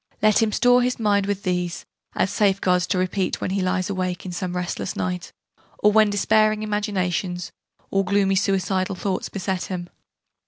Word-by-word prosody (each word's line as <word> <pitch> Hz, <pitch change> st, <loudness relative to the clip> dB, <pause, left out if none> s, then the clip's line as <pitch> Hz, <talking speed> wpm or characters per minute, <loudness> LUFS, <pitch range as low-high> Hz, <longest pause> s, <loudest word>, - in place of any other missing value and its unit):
Let 215 Hz, 0 st, +4 dB
him 220 Hz, -1 st, +2 dB
store 245 Hz, +3 st, +4 dB
his 250 Hz, 0 st, 0 dB
mind 205 Hz, -2 st, +2 dB
with 200 Hz, -1 st, -2 dB
these, 180 Hz, -1 st, -2 dB, 0.3 s
as 185 Hz, -, +1 dB
safeguards 190 Hz, -3 st, +2 dB
to 195 Hz, -, 0 dB
repeat 185 Hz, +1 st, -1 dB
when -, -, -2 dB
he 195 Hz, 0 st, 0 dB
lies 185 Hz, 0 st, 0 dB
awake 185 Hz, -2 st, -3 dB
in 185 Hz, -, -5 dB
some 180 Hz, 0 st, -4 dB
restless 175 Hz, -, -3 dB
night, 90 Hz, -1 st, -3 dB, 0.5 s
or 210 Hz, -, +4 dB
when 215 Hz, 0 st, +5 dB
despairing 215 Hz, +1 st, +2 dB
imaginations, 190 Hz, -4 st, -2 dB, 0.4 s
or 195 Hz, 0 st, +2 dB
gloomy, 195 Hz, 0 st, +2 dB
suicidal 190 Hz, 0 st, 0 dB
thoughts, 190 Hz, +1 st, -2 dB
beset 190 Hz, -1 st, -3 dB
him. 175 Hz, -2 st, -5 dB
190 Hz, 165 wpm, -23 LUFS, 180-205 Hz, 0.5 s, when